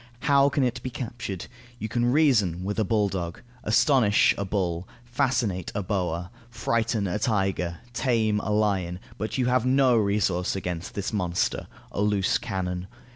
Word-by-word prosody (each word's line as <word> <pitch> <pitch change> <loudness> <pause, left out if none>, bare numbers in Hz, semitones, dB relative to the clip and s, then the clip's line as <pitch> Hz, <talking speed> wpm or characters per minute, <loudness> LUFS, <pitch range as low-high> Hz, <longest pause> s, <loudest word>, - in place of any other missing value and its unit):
How 140 -1 +4
can 140 -1 +1
it 125 -1 -1
be 130 - -4
captured? 115 -7 -5 0.3
You 110 - -4
can 120 +2 +1
reason 110 - +3
with 100 +3 -2
a - - +3
bulldog, 95 -5 -1 0.2
astonish 110 -1 +4
a 100 - -2
bull, 95 -3 -2 0.2
fascinate 120 - 0
a 105 - -1
boa, 90 -3 -2 0.2
frighten 115 -2 0
a 95 +3 -1
tiger, 95 -5 0 0.2
tame 115 -5 +1
a 105 - -4
lion; 100 -4 +1 0.2
but 110 +4 -3
you 130 - +1
have 125 -1 +2
no 130 -1 +4
resource 100 -4 +1
against 90 -2 -4
this 100 +2 -3
monster, 90 -4 -1 0.2
a - - -2
loose 105 -2 +2
cannon. 90 -3 -3
105 Hz, 155 wpm, -26 LUFS, 95-120 Hz, 0.3 s, How